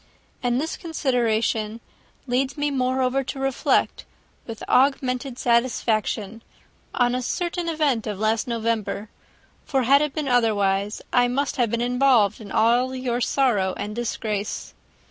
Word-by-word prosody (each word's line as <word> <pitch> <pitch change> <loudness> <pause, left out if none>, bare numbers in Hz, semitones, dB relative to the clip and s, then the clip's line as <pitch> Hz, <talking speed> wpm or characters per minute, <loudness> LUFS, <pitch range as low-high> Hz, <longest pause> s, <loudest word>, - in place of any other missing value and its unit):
And 245 0 +1
this 320 +3 -3
consideration 230 - 0 0.5
leads 260 +2 -1
me, 290 0 0
moreover, 260 0 0
to 275 - -5
reflect, 270 -1 +1 0.4
with 225 -2 -7
augmented 260 -1 +1
satisfaction, 230 -3 0 0.5
on 245 -1 +2
a 255 - -1
certain 345 +5 -2
event 290 -9 0
of 210 -2 -3
last 220 +3 0
November; 220 -3 -2 0.5
for 265 -2 0
had 275 +4 +5
it 300 -2 -2
been 305 -3 -2
otherwise, 210 -4 +1
I 245 0 +4
must 275 +4 -1
have 240 -3 +2
been 235 +1 -1
involved 245 -4 +3
in 200 -2 -10
all 245 +4 +2
your 250 -1 -2
sorrow 215 -9 +1
and 210 +1 -5
disgrace. 215 -3 -3
245 Hz, 135 wpm, -23 LUFS, 220-265 Hz, 0.5 s, had